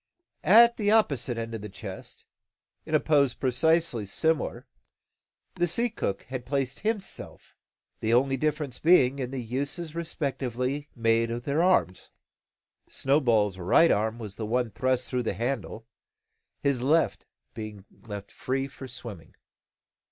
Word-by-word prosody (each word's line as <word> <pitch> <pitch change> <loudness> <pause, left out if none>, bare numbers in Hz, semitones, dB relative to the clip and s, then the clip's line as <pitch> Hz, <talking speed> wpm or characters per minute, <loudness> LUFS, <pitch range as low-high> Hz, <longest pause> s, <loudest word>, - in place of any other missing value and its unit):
At 235 +4 +7
the 205 -2 +1
opposite 140 - +2
end 115 0 -4
of 110 - -5
the 105 - -7
chest, 95 - -8 0.6
in - - +1
a - - +5
pose 140 -4 +2
precisely 135 -3 +1
similar, 160 - 0 0.9
the 175 0 +1
sea 235 +7 +1
cook 100 - -3
had 130 +1 -6
placed 135 0 -2
himself, 215 -2 -4 0.5
the 110 - -1
only 135 +3 +3
difference 150 -2 -2
being 140 -5 +4
in 125 -2 -2
the 135 - -5
uses 140 +7 -3
respectively 140 -4 -3
made 115 -1 +2
of 120 +1 -4
their 145 +5 +1
arms. 170 - +2 0.8
Snowball's 115 -9 +2
right 120 - +5
arm 110 +2 +1
was 105 -4 -8
the 110 - -4
one 120 0 0
thrust 130 +2 0
through 125 -1 -1
the 115 - -1
handle, 115 -2 -3 0.8
his 140 -4 +1
left 155 +6 +1 0.3
being 105 -3 -8 0.2
left 100 -1 -7
free 135 +1 -2
for 135 -1 -10
swimming. 115 -8 -9
130 Hz, 140 wpm, -27 LUFS, 115-150 Hz, 0.9 s, At